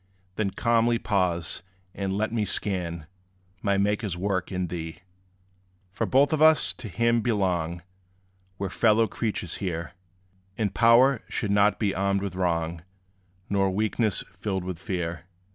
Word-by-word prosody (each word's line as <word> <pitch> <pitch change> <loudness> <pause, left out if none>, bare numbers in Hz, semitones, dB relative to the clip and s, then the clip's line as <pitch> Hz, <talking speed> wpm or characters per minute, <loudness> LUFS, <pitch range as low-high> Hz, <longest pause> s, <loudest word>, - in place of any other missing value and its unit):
Then 105 -1 0
calmly 115 +2 +2
pause, 90 -7 -1 0.3
and 95 -1 -2
let 110 +2 -1
me 110 -2 +1
scan 85 -6 -2 0.6
My 100 -1 +1
Maker's 100 -2 0
work 95 0 -1
in 90 -1 -1
thee. 80 -1 -6 0.9
For - - -2
both 140 +3 +4
of 155 - 0
us 155 0 +5
to 130 - -9
him 115 +4 +1
belong; 90 -7 0 0.7
We 100 - -3
're - - -3
fellow 115 +1 +4
creatures 105 -5 -3
here; 85 -4 -4 0.7
And 105 -4 -1
power 120 +2 +5
should 105 - -2
not 100 +1 +4
be 100 -3 0
armed 100 0 0
with 100 -3 -3
wrong, 85 -2 -1 0.7
Nor 100 -1 +1
weakness 105 +1 0 0.2
filled 95 -2 -2
with 90 -2 -5
fear. 85 -3 -4
100 Hz, 145 wpm, -26 LUFS, 90-110 Hz, 0.9 s, us